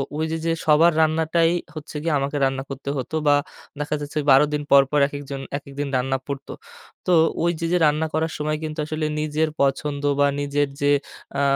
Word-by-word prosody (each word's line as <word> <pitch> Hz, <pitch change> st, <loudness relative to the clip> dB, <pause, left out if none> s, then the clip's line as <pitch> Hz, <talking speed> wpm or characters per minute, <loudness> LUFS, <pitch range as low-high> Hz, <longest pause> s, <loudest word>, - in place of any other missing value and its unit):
ঐ -, -, -3 dB
যে, 160 Hz, -, -1 dB
যে 165 Hz, -, +2 dB
সবার 160 Hz, +3 st, +5 dB
রান্নাটাই 160 Hz, +1 st, +2 dB, 0.2 s
হচ্ছে 155 Hz, 0 st, -9 dB
গিয়ে 165 Hz, -2 st, 0 dB
আমাকে 140 Hz, +2 st, -2 dB
রান্না 135 Hz, 0 st, -1 dB
করতে 135 Hz, 0 st, -6 dB
হতো 130 Hz, +4 st, -4 dB
বা 145 Hz, -, +6 dB, 0.5 s
দেখা 150 Hz, +1 st, -1 dB
যাচ্ছে, 145 Hz, +1 st, -6 dB
১২ 135 Hz, +1 st, +8 dB
দিন 150 Hz, -, 0 dB
পরপর, 140 Hz, +1 st, +5 dB
একেকজন 140 Hz, -1 st, -6 dB, 0.2 s
একেকদিন 140 Hz, 0 st, -6 dB
রান্না 135 Hz, +1 st, 0 dB
পড়তো, 140 Hz, -1 st, -6 dB, 0.5 s
তো 180 Hz, -, +1 dB, 0.3 s
ওই 170 Hz, -, +3 dB
যে, 165 Hz, -, -2 dB
যে 180 Hz, -, +4 dB
রান্না 150 Hz, +2 st, +2 dB
করার 160 Hz, +1 st, 0 dB
সময় 155 Hz, 0 st, -1 dB
কিন্তু 155 Hz, 0 st, -5 dB
আসলে 155 Hz, 0 st, -3 dB
নিজের 155 Hz, +1 st, 0 dB
পছন্দ 140 Hz, +1 st, 0 dB, 0.2 s
বা 145 Hz, -, +5 dB
নিজের 145 Hz, 0 st, 0 dB
যে, 145 Hz, -, +3 dB, 0.5 s
আ -, -, +1 dB
145 Hz, 185 wpm, -23 LUFS, 140-155 Hz, 0.5 s, ১২